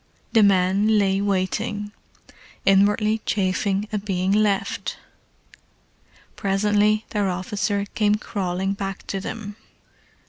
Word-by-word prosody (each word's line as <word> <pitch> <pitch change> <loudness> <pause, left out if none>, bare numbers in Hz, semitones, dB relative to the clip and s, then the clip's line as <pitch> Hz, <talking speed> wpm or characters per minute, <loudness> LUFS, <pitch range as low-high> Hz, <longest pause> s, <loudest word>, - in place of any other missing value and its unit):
The 225 - +6
men 200 +2 +3
lay 195 -1 +2
waiting, 205 +2 -1 0.7
inwardly 210 +3 +3
chafing 195 +1 0
at 205 -2 -2
being 190 -2 -1
left. 205 -1 0 1.4
Presently 210 +2 +1
their 205 -3 0
officer 200 +2 -2
came 210 -1 +2
crawling 195 -2 -2
back 195 -1 -5
to 195 - -3
them. 205 +1 -6
200 Hz, 100 wpm, -23 LUFS, 195-210 Hz, 1.4 s, The